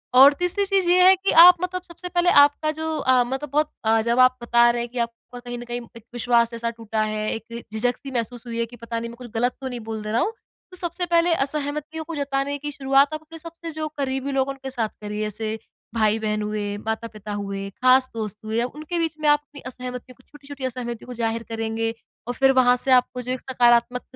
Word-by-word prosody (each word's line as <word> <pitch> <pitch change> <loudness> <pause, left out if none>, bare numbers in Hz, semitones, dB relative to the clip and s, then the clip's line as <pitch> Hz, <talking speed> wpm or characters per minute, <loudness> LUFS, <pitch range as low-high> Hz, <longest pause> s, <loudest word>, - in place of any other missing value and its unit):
और 275 +3 +9
तीसरी 360 +3 0
चीज़ 385 -2 +1
ये 360 +1 +5
है 375 +1 +8
कि 385 +1 -1
आप 360 0 +10
मतलब 365 0 -2
सबसे 360 0 -10
पहले 350 0 +2
आपका 290 +2 +4
जो 315 0 -3
अ, 260 -3 +3
मतलब 265 +4 -4
बहुत 300 +1 +1
अ, 225 0 +4
जब 235 +2 0
आप 255 0 +5
बता 235 0 +4
रहे 240 0 -2
हैं 240 - -5
कि 250 - -4
आपका 235 +1 -5
कहीं 245 0 -7
न - - -7
कहीं 240 0 -4 0.2
एक 230 - -14
विश्वास 235 -1 +2
ऐसा 230 0 -2
टूटा 225 -1 -3
है, 215 0 -2
एक 235 +1 -8
झिझक-सी 245 +4 -2
महसूस 240 0 -4
हुई 230 0 -5
है 235 - +1
कि 235 +1 -13
पता 230 0 -5
नहीं 230 0 -5
मैं 235 - -10
कुछ 245 -2 -10
गलत 245 +2 +1
नहीं 250 -2 -4
बोल 220 -1 -4
दे 215 - -4
रहा 230 - +2
हूँ। 445 - 0 0.4
तो 365 - -11
सबसे 350 0 -3
पहले 340 0 +3
असहमतियों 300 +2 -2
को 330 +1 -7
जताने 280 0 -1
की 295 +1 -5
शुरुआत 275 +1 +2
आप 310 - -4
अपने 325 +1 -12
सबसे 335 0 -8
जो 310 0 -4
करीबी 270 0 -2
लोग 270 0 +1
उनके 270 -1 -6
साथ 235 -4 -2
करिए। 210 0 -4
जैसे 215 +1 -3 0.4
भाई-बहन 215 -1 +1
हुए, 210 -1 -3
माता-पिता 220 -1 -5
हुए, 195 -1 -4
खास 255 +1 +5
दोस्त 215 -2 -4
हुए। 220 +1 -1
अ, - - +1
उनके 310 +6 -5
बीच 325 -1 -1
में 300 - +1
आप 295 - +5
अपनी 285 0 -14
असहमतियों 250 0 -8
को 255 - -24
छोटी-छोटी 285 -2 -9
असहमति 240 -2 -5
को 250 - -8
ज़ाहिर 230 -1 -2
करेंगे 225 0 -2 0.3
और 245 - -2
फिर 270 +2 +4
वहाँ 245 0 +5
से 265 - +1
आपको 250 0 +3
जो 250 +1 -5
एक 255 - -3
सकारात्मक 245 -1 +2
250 Hz, 230 wpm, -23 LUFS, 230-295 Hz, 0.4 s, आप